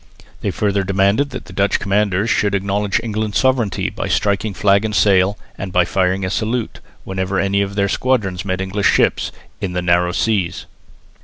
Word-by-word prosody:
They - - -2
further 100 -2 0
demanded 100 +8 +2
that 95 - -8
Dutch 100 +2 +1
commanders 100 0 +1
should 100 -1 +1
acknowledge 100 +1 0
England's 110 -2 -2
sovereignty 130 -6 +1
by - - -4
striking 100 0 0
flag 100 +3 +3
and 110 -1 -2
sail 100 -1 +3 0.2
and 95 -1 -5
by 90 -1 +3
firing 95 +1 0
a 95 - -3
salute, 115 +1 -2 0.2
whenever 95 0 -2
any 100 +1 +1
of 100 0 -3
their 100 -1 +2
squadrons 100 -6 0
met 95 -1 -2
English 95 +1 +1
ships - - +1 0.3
"in 90 -2 -3
the 90 - -1
narrow 90 0 +2
seas." 95 -4 -1
100 Hz, 170 wpm, -18 LUFS, 95-105 Hz, 0.3 s, flag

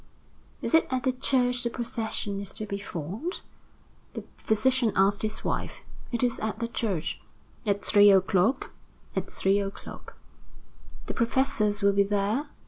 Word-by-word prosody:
"Is - - -1
it 325 - +5
at 255 -1 -1
the 260 - +2
church 250 -1 +1
the 240 - -1
procession 220 -4 -3
is 195 -1 -5
to 215 - -4
be 200 -1 -4
formed?" 200 - -5 0.7
the - - -5
physician 235 +2 +2
asked 195 +1 +3
his 215 0 -3
wife. - - -3 0.3
"It 235 0 -1
is 245 -1 +1
at 220 0 -2
the 230 +1 -2
church." 200 -8 -3 0.5
"At 200 -1 0
three 205 0 +7
o'clock?" 195 +5 +3 0.4
"At - - -2
three 195 +1 +2
o'clock." 195 0 -7 0.9
"The - - -4
professors 230 -4 +1
will 200 0 +5
be 200 - +4
there?" 205 +7 0
215 Hz, 150 wpm, -27 LUFS, 200-245 Hz, 0.9 s, three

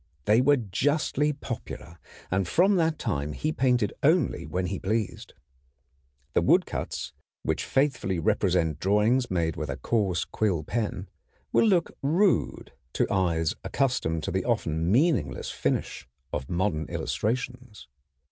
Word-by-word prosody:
They 110 +4 +5
were 145 +2 +4
justly 145 - 0
popular, 120 - -7 0.3
and 95 0 +1
from 190 - +4
that 160 -2 +1
time 75 - -2
he 155 - -1
painted 125 -7 +1
only 155 -1 +2
when 90 0 -2
he 95 +1 -3
pleased. 110 +1 -3 1.0
The - - +3
woodcuts, - - 0 0.3
which 80 0 -1
faithfully 135 -9 0
represent 90 -5 +1
drawings 105 +6 +2
made 85 -3 0
with 75 -4 -4
a 70 - -3
coarse 95 -2 0
quill 95 -8 0
pen, 105 0 -3 0.5
will 230 - +5
look 180 -5 +2
rude 175 +8 +1 0.2
to - - +2
eyes 85 -4 +1
accustomed 80 - 0
to - - -2
the 95 +2 0
often 85 -8 0
meaningless 115 - +1
finish - - -2 0.3
of 65 - -3
modern 85 -3 0
illustrations. 125 - -3
105 Hz, 130 wpm, -27 LUFS, 85-135 Hz, 1.0 s, They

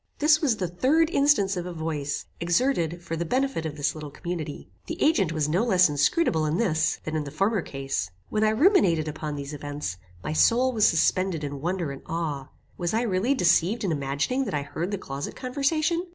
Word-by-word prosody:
This 305 +1 +4
was 260 -8 +2
the 185 - -1
third 285 - +2
instance 275 - +3
of 180 0 -4
a 180 - -5
voice, 150 -3 -3
exerted 175 - 0
for 165 - -4
the 165 - -2
benefit 255 -3 -1
of 150 -1 -7
this 145 - 0
little 155 -2 -7
community. 155 -1 -6 0.2
The 330 - -5
agent 210 - +3
was 155 -3 0
no 175 +8 +1
less 185 -7 +4
inscrutable 155 - +2
in 155 +3 0
this, 170 -9 +1
than 155 - -4
in 155 - 0
the 145 - -6
former 195 +7 0
case. 135 - -3 0.2
When 215 - 0
I 215 - +4
ruminated 215 - +3
upon 155 -1 -4
these 140 +1 -6
events, 145 - -5 0.3
my 155 - -3
soul 250 +9 +3
was 215 -3 +4
suspended 175 0 +1
in 140 -1 -5
wonder 175 -2 -2
and 135 - -8
awe. 155 -5 -3 0.3
Was 175 +3 -1
I 230 - +1
really 225 +5 +1
deceived 180 +1 +2
in 190 - 0
imagining 145 - -1
that 200 - -3
I 145 - -1
heard 170 +5 -4
the 200 - -2
closet 140 -5 -6
conversation? 305 +6 0
175 Hz, 205 wpm, -26 LUFS, 150-235 Hz, 0.3 s, This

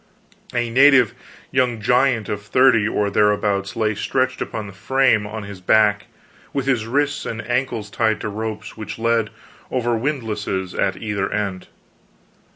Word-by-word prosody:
A 120 -1 -1
native 130 -2 +6 0.4
young 125 -4 +1
giant 125 0 +2
of 105 - -3
thirty 115 0 +4
or 105 -2 0
thereabouts 105 -1 +1
lay 110 -1 +1
stretched 130 +5 -1
upon 110 -2 -4
the 100 - -10
frame 115 0 +2
on 110 0 -6
his 100 -2 -9
back, 105 +2 +3 0.5
with 135 -2 -1
his 125 -5 0
wrists 145 +4 0
and 110 -1 -5
ankles 120 -4 -2
tied 110 -2 +1
to - - -3
ropes 110 +1 -5
which 110 -1 -7
led 115 -1 +1 0.4
over 120 -2 0
windlasses 110 -8 -2
at 95 - 0
either 100 -3 -2
end. 100 -3 -3
110 Hz, 150 wpm, -21 LUFS, 105-125 Hz, 0.5 s, native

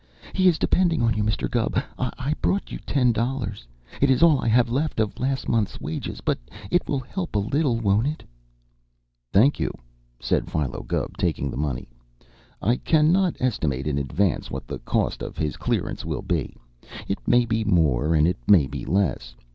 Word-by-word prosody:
He 185 -1 +3
is 170 -3 +4
depending 170 -7 +2
on 115 -1 +3
you, 105 - -1
Mr. 110 0 0
Gubb. 120 -1 -1 0.2
I 130 +3 -2
brought 195 - 0
you - - -5
ten 125 -4 +3
dollars 115 - -3 0.3
it 140 - +4
is 130 +4 +4
all 155 -5 +6
I - - -1
have 120 +2 +4
left 145 +1 -1
of 110 -2 -1
last 135 +1 -1
month's 110 -3 0
wages, 80 - -5
but - - 0 0.3
it 175 - +2
will 140 -2 0
help 175 - -5
a - - +4
little, 120 +4 +1
won't 105 +3 +2
it?" 155 +1 -4 1.1
"Thank 130 +9 +4
you," - - 0 0.5
said - - 0
Philo 75 -5 -2
Gubb, - - -2
taking 70 -1 -1
the - - -6
money. 70 -2 -2 0.8
"I 120 +5 +3
cannot 165 +3 +3
estimate 75 - -1
in 70 -2 0
advance 80 +6 0
what - - -5
the - - -6
cost - - -1
of - - -6
his 75 -2 -1
clearance - - -2
will - - -3
be. - - -2 0.5
It 100 - -2
may 120 0 +4
be 110 -1 0
more, 80 - +2
and 75 +1 +4
it 90 - 0
may 90 -9 +6
be 65 -1 -6
less. 95 -1 0
115 Hz, 185 wpm, -24 LUFS, 85-140 Hz, 1.1 s, all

